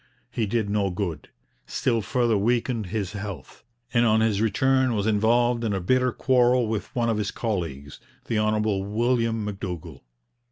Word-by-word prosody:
He 110 Hz, -3 st, -1 dB
did 110 Hz, 0 st, 0 dB
no 100 Hz, -1 st, 0 dB
good, 90 Hz, -5 st, -4 dB, 0.4 s
still 115 Hz, -3 st, 0 dB
further 115 Hz, +2 st, +1 dB
weakened 115 Hz, +1 st, 0 dB
his 100 Hz, 0 st, -3 dB
health, 100 Hz, -9 st, -8 dB, 0.3 s
and 120 Hz, -1 st, +4 dB
on 110 Hz, -1 st, +4 dB
his 110 Hz, -2 st, +1 dB
return 130 Hz, +3 st, +2 dB
was 100 Hz, -1 st, -1 dB
involved 115 Hz, +3 st, +2 dB
in 110 Hz, -3 st, 0 dB
a -, -, -1 dB
bitter 125 Hz, +7 st, +2 dB
quarrel 125 Hz, -2 st, +3 dB
with 110 Hz, -1 st, -2 dB
one 120 Hz, -1 st, +1 dB
of 115 Hz, -2 st, +1 dB
his 105 Hz, -1 st, -1 dB
colleagues, 80 Hz, -, -4 dB, 0.3 s
the 115 Hz, -2 st, 0 dB
Hon. 110 Hz, 0 st, +1 dB
William 110 Hz, +2 st, 0 dB
M'Dougall. 90 Hz, -6 st, -6 dB
110 Hz, 160 wpm, -25 LUFS, 100-120 Hz, 0.4 s, and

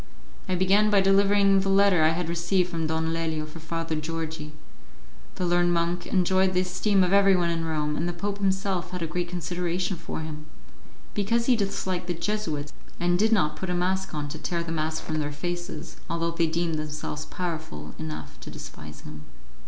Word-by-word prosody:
I 185 Hz, -, +2 dB
began 195 Hz, +4 st, +4 dB
by 205 Hz, -1 st, +5 dB
delivering 195 Hz, 0 st, +5 dB
the 195 Hz, 0 st, 0 dB
letter 195 Hz, -3 st, +5 dB
I 155 Hz, -, +6 dB
had 165 Hz, +1 st, -1 dB
received 175 Hz, +2 st, +1 dB
from 165 Hz, -2 st, -1 dB
Don 160 Hz, +1 st, 0 dB
Lelio 160 Hz, -2 st, -1 dB
for 155 Hz, +2 st, -10 dB
Father 165 Hz, 0 st, -3 dB
Georgi. 160 Hz, 0 st, -4 dB, 0.8 s
The 180 Hz, -, -1 dB
learned 175 Hz, 0 st, +3 dB
monk 170 Hz, +1 st, 0 dB
enjoyed 185 Hz, 0 st, +3 dB
the 180 Hz, -, +4 dB
esteem 185 Hz, +2 st, +2 dB
of 180 Hz, +1 st, +1 dB
everyone 195 Hz, -4 st, +5 dB
in 165 Hz, -1 st, -1 dB
Rome, 150 Hz, -2 st, -1 dB
and 170 Hz, +3 st, -1 dB
the -, -, 0 dB
Pope 200 Hz, +4 st, -3 dB
himself 190 Hz, -2 st, 0 dB
had 180 Hz, -1 st, -4 dB
a -, -, +1 dB
great 175 Hz, +2 st, -2 dB
consideration 175 Hz, +1 st, -2 dB
for 165 Hz, -1 st, -5 dB
him, 155 Hz, -1 st, -7 dB, 0.7 s
because 230 Hz, +3 st, +1 dB
he 255 Hz, -, +5 dB
disliked 190 Hz, -4 st, -2 dB
the 175 Hz, -, -1 dB
Jesuits, 165 Hz, -6 st, -2 dB, 0.3 s
and 175 Hz, 0 st, +2 dB
did 220 Hz, +2 st, +4 dB
not 180 Hz, -9 st, +3 dB
put 190 Hz, -, -4 dB
a 180 Hz, -, +1 dB
mask 190 Hz, 0 st, 0 dB
on 145 Hz, -1 st, -2 dB
to 155 Hz, -, -6 dB
tear 170 Hz, +1 st, -1 dB
the 165 Hz, -, -5 dB
mask 160 Hz, 0 st, -1 dB
from 155 Hz, -1 st, -2 dB
their 145 Hz, -1 st, -1 dB
faces, 175 Hz, +4 st, -5 dB
although 170 Hz, 0 st, 0 dB
they 165 Hz, 0 st, +1 dB
deemed 165 Hz, -1 st, 0 dB
themselves 150 Hz, 0 st, -4 dB
powerful 160 Hz, -, -5 dB
enough 75 Hz, -5 st, -6 dB
to -, -, -9 dB
despise 75 Hz, 0 st, -9 dB
him. 75 Hz, 0 st, -9 dB
175 Hz, 190 wpm, -27 LUFS, 160-190 Hz, 0.8 s, I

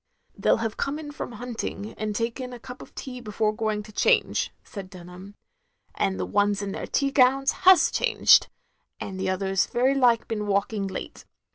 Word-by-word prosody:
" -, -, -43 dB
"They -, -, -1 dB
'11 225 Hz, -, +3 dB
have 225 Hz, -1 st, -3 dB
come 275 Hz, +2 st, -2 dB
in 305 Hz, -2 st, -7 dB
from 290 Hz, -, -6 dB
hunting 225 Hz, -2 st, -5 dB
and 215 Hz, -1 st, -4 dB
taken 240 Hz, +3 st, -3 dB
a 245 Hz, -, -9 dB
cup 250 Hz, +2 st, -10 dB
of -, -, -14 dB
tea 250 Hz, -2 st, -7 dB
before 215 Hz, -1 st, -1 dB
going 215 Hz, -1 st, -2 dB
to 215 Hz, -, -13 dB
change," -, -, +2 dB
said 195 Hz, -3 st, -9 dB
Dunham, 185 Hz, +2 st, -12 dB, 0.6 s
"and 95 Hz, -1 st, -1 dB
the 90 Hz, -, -1 dB
ones 205 Hz, -, +1 dB
in 200 Hz, -, -4 dB
their -, -, -5 dB
tea 275 Hz, 0 st, 0 dB
gowns 270 Hz, 0 st, +4 dB, 0.2 s
has 375 Hz, -, +6 dB
changed; -, -, +4 dB, 0.5 s
and 190 Hz, -1 st, -6 dB
the 190 Hz, 0 st, -1 dB
others 190 Hz, 0 st, 0 dB
very 255 Hz, +3 st, +2 dB
like 245 Hz, -4 st, +3 dB
been 210 Hz, -2 st, -3 dB
walking 200 Hz, 0 st, 0 dB
late. 190 Hz, -, -7 dB
215 Hz, 190 wpm, -25 LUFS, 200-250 Hz, 0.6 s, has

